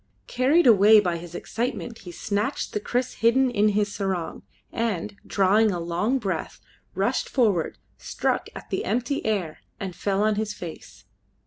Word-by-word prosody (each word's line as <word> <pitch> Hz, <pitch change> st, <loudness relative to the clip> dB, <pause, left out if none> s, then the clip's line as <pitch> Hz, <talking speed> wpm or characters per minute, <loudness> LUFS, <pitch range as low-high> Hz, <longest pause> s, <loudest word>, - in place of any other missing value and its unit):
Carried 275 Hz, +7 st, +3 dB
away 215 Hz, -2 st, +7 dB
by 175 Hz, -4 st, 0 dB
his 170 Hz, 0 st, -10 dB
excitement, 235 Hz, +1 st, -4 dB
he 180 Hz, -, -9 dB
snatched 210 Hz, -, -2 dB
the -, -, 0 dB
kriss 245 Hz, +4 st, -2 dB
hidden 250 Hz, +3 st, +4 dB
in 210 Hz, -2 st, +3 dB
his 205 Hz, 0 st, 0 dB
sarong, 190 Hz, -4 st, -3 dB, 0.3 s
and, 210 Hz, -3 st, -2 dB
drawing 205 Hz, +3 st, +3 dB
a 180 Hz, -3 st, -2 dB
long 175 Hz, +10 st, 0 dB
breath, 190 Hz, -9 st, -4 dB, 0.4 s
rushed -, -, 0 dB
forward, 210 Hz, -, +1 dB, 0.2 s
struck -, -, -2 dB
at -, -, -10 dB
the -, -, -1 dB
empty 245 Hz, +6 st, -1 dB
air, 195 Hz, -8 st, -2 dB, 0.2 s
and 190 Hz, -3 st, -5 dB
fell 200 Hz, +3 st, 0 dB
on 215 Hz, -1 st, +2 dB
his 210 Hz, -1 st, -2 dB
face. 170 Hz, -5 st, -10 dB
210 Hz, 155 wpm, -25 LUFS, 185-230 Hz, 0.4 s, away